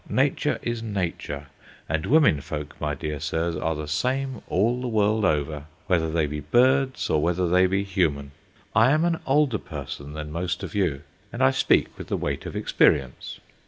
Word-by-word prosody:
Nature - - +1
is 120 -1 -2
nature, 90 -9 -3 0.4
and 80 0 -1
womenfolk, 75 - +2
my 75 -1 -1
dear 75 +1 -4
sirs, 80 +2 -1
are 80 0 -1
the 75 0 -5
same 130 - -1
all 115 +6 +1
the 125 - -3
world 110 -1 +2
over, 75 -4 0 0.2
whether 80 -3 +1
they 80 -1 +1
be 75 +1 -4
birds 130 - +2
or 75 - +2
whether 90 +2 +1
they 90 +2 +4
be 95 +2 0
human. 80 -8 -1 0.4
I 115 +3 +6
am 155 +4 +3
an 165 -1 0
older 135 -4 +3
person 70 -1 -7
than 75 -1 -6
most 85 +2 -3
of - - -6
you, 85 -9 0 0.3
and 125 +2 -1
I 130 - +6
speak 130 - +2
with - - -7
the - - -1
weight - - -3
of - - -7
experience. 65 -2 +1
90 Hz, 180 wpm, -25 LUFS, 75-120 Hz, 0.4 s, I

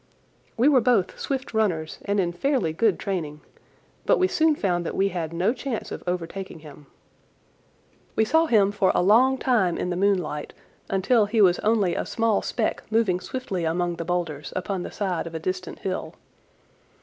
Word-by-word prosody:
We 240 +5 +4
were 275 -4 +5
both 230 -6 +1
swift 265 -3 -3
runners 175 -8 -1
and 200 0 0
in 175 -2 +1
fairly 200 - 0
good 215 +3 +2
training, 155 -6 -4 0.7
but - - +5
we 370 - +3
soon 315 -4 +2
found 175 -8 0
that - - -4
we 195 +1 +2
had 165 -4 -4
no 180 +7 +1
chance 260 -4 -5
of - - -6
overtaking 180 -1 -4
him. 150 -2 -13 1.3
We 220 - +3
saw 320 +7 +3
him 205 -6 +4
for 200 -2 +2
a - - +3
long 250 +7 +5
time 220 -10 +1
in 180 - -2
the - - -1
moonlight 180 -6 0 0.4
until 205 +3 +2
he 220 +2 0
was 180 -4 +5
only 210 -5 +2
a - - -3
small 225 -2 +1
speck 225 -3 -2
moving 215 -5 +2
swiftly 195 -5 -4
among 170 +1 -1
the - - -3
boulders 170 -4 -3
upon 185 0 -2
the - - -5
side 185 -5 -2
of 165 - -8
a - - -2
distant 185 +1 -4
hill. 185 -1 -4
195 Hz, 180 wpm, -25 LUFS, 175-225 Hz, 1.3 s, were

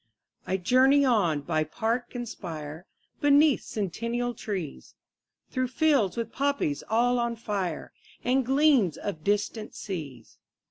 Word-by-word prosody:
20 190 - 0
I - - -19
journey 265 +6 +5
on 185 - +2
by 155 +2 0
park 230 - -2
and 240 -1 -4
spire, 160 -3 -7 0.3
Beneath 290 0 +5
centennial 235 +5 -3
trees, 190 -9 -6 0.6
Through 255 -1 0
fields 260 - +2
with 230 -1 -3
poppies 280 - 0
all 245 +3 +3
on 235 0 -1
fire, 200 -7 -3 0.3
And 260 +2 +2
gleams 265 - +3
of 165 -7 -5
distant 210 +2 -1
seas. 145 - -7
225 Hz, 130 wpm, -27 LUFS, 180-255 Hz, 0.6 s, journey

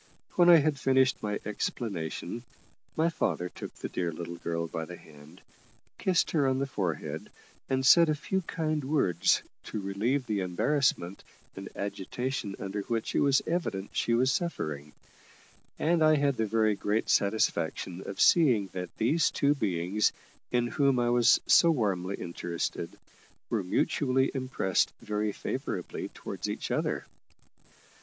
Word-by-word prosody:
When 175 -1 +4
I 175 - +10
had 150 -2 +1
finished 130 -1 +3
my 105 -1 -2
explanation, 105 -1 -4 0.5
my 160 +1 +2
father 90 - -1
took - - -8
the - - -5
dear 85 -2 -2
little 85 +1 -6
girl 85 0 -3
by 80 0 -4
the 90 +2 -9
hand, 75 +3 -16 0.6
kissed 185 -3 +2
her 145 -4 +2
on 130 0 +1
the 135 - 0
forehead, 85 - -3 0.4
and 130 0 0
said 170 +4 +7
a 155 - +2
few 180 +6 -2
kind 155 -3 -2
words 130 - +2 0.2
to 110 - -4
relieve 110 +8 -1
the 105 -3 -1
embarrassment 95 0 0 0.3
and 95 0 -7
agitation 100 +2 -3
under 100 +1 -4
which 115 +2 -3
it - - +2
was 140 -1 +3
evident 130 - -2
she 115 - +1
was 130 +2 +3
suffering; 75 - -3 0.8
and 165 0 +2
I 155 0 +6
had 140 -2 +2
the 110 -2 -1
very 110 0 +2
great 105 +2 -1
satisfaction 95 -3 0
of 100 - -6
seeing 125 - +4
that 90 -1 -4
these 150 +9 +2
two 140 +1 +2
beings, 95 - 0 0.4
in 120 -1 +2
whom 135 +1 +2
I 120 -1 +2
was 120 -1 +5
so 170 - +6
warmly 100 - 0
interested, 85 -1 -4 0.5
were 110 -4 0
mutually 130 +8 +1
impressed 130 -8 0
very 105 0 -1
favourably - - -4
towards - - -6
each - - -4
other. - - -1
110 Hz, 150 wpm, -29 LUFS, 95-140 Hz, 0.8 s, I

